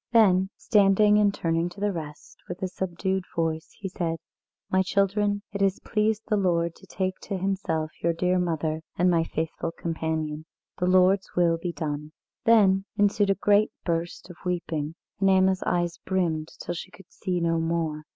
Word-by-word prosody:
Then 190 -5 +5
standing 210 0 +4
and 205 -1 +4
turning 165 -3 0
to 175 - -13
the 205 0 +1
rest, 155 -5 -8
with 180 +1 -6
a - - +1
subdued 190 +1 -2
voice 160 -1 -1
he 200 - -4
said: 170 -3 -2 0.5
"My 190 - +2
children, 205 +1 +1
it 200 - -3
has 195 0 +2
pleased 215 0 0
the 215 - +1
Lord 170 -3 +1
to - - -17
take 185 0 -2
to 195 - -4
Himself 180 -5 -1
your 170 - +2
dear 180 +2 +1
mother 160 -2 -1 0.2
and 180 +1 +4
my 165 -1 +3
faithful 165 +1 -3
companion. 160 -2 -3 0.3
The 180 - +1
Lord's 185 +1 +4
will 170 -2 +3
be 175 +1 -3
done." 150 -1 -4 0.3
Then 200 -4 +5
ensued 205 0 +3
a 195 - +4
great 205 +2 +3 0.2
burst 170 0 -2
of 175 - -14
weeping, 165 -4 -2 0.2
and 195 -1 +3
Anna's 190 0 +4
eyes 175 -1 0
brimmed 170 -5 0
till 175 - -4
she 175 +2 -7
could 195 -1 -17
see 180 -2 -2
no 165 -1 +1
more. 165 -2 -1
180 Hz, 175 wpm, -26 LUFS, 165-195 Hz, 0.5 s, Then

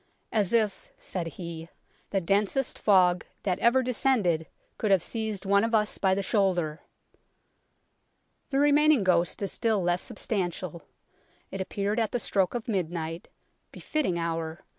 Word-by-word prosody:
"As 205 -4 +1
if 215 -4 0
(said 175 -3 -4
he) 170 -2 -7 0.4
the 195 - +1
densest 205 +8 0
fog 180 -3 +4 0.2
that 185 -3 0
ever 255 +3 +4
descended 225 - +1 0.3
could 215 - 0
have 190 -4 +4
seized 220 -4 -3
one 200 +1 +3
of 230 0 +1
us 210 -1 +1
by 190 -1 +3
the 200 - -2
shoulder! 180 -7 0 0.8
" - - -47
The 270 - -1
remaining 290 -3 +4
ghost 175 +1 +1
is 195 - -1
still 225 -3 +2
less 175 0 +1
substantial. 180 -4 -3 0.7
It 195 - -4
appeared 200 +3 -2
at 225 -2 -1
the 245 - 0
stroke 195 -2 +1
of 235 - -4
midnight 170 -5 -3 0.4
befitting 280 - -2
hour 165 +1 -3
195 Hz, 145 wpm, -27 LUFS, 175-225 Hz, 0.8 s, fog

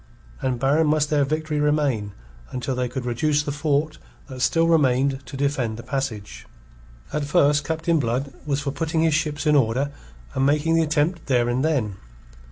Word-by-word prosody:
And 125 -2 -1
barren 145 +5 +3
must 150 0 +1
their 145 -2 +3
victory 155 +1 -2
remain 145 -9 +1 0.4
until 130 +1 -3
they 125 -1 -1
could 130 -1 -5
reduce 145 +5 +1
the 145 - -3
fort 150 +1 -1 0.3
that 130 -3 -8
still 150 +7 +3
remained 135 -4 +2
to 135 +2 -7
defend 135 -5 -1
the 115 - -8
passage. 120 -8 -4 0.7
At 150 0 -1
first 145 -2 +3
Captain 160 +2 0
Blood 130 +2 -2
was 145 -1 -1
for 140 -1 -2
putting 160 +2 -1
his 160 -2 +3
ships 155 -1 -1
in 150 -1 +4
order 135 +2 +2 0.4
and 135 - 0
making 150 +3 +2
the 165 - +4
attempt 160 +2 0
there 125 -3 +2
and 120 +2 0
then. 125 -11 0
145 Hz, 175 wpm, -23 LUFS, 130-155 Hz, 0.7 s, in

